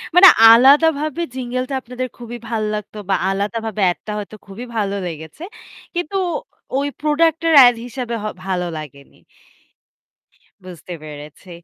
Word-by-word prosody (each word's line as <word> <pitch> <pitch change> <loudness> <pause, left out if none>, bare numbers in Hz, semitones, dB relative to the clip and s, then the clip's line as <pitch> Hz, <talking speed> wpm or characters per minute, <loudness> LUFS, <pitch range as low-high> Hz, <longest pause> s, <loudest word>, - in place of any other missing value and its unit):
মানে 385 +2 +10 0.2
আলাদাভাবে 295 +7 +5
jingle 255 0 -3
টা 275 - -4
আপনাদের 250 +2 -5
খুবই 240 0 -8
ভালো 220 -2 -1
লাগতো 210 0 -7
বা 195 - +3
আলাদাভাবে 210 +2 -3
এডটা 210 - -8
হয়তো 210 +1 -8
খুবই 205 +6 -8
ভালো 200 -2 -1
লেগেছে। 160 - -9 0.5
কিন্তু 350 +2 -3 0.6
ওই 280 +1 0
প্রোডাক্ট 310 +1 +1
এর 325 - +3
এড 245 -1 +7
হিসাবে 245 -1 -5
হ - - -5 0.2
ভালো 180 -2 -2
লাগেনি। 140 -2 -11 1.5
বুঝতে 180 -1 -10
পেরেছি। 150 +4 -11
230 Hz, 135 wpm, -19 LUFS, 195-275 Hz, 1.5 s, মানে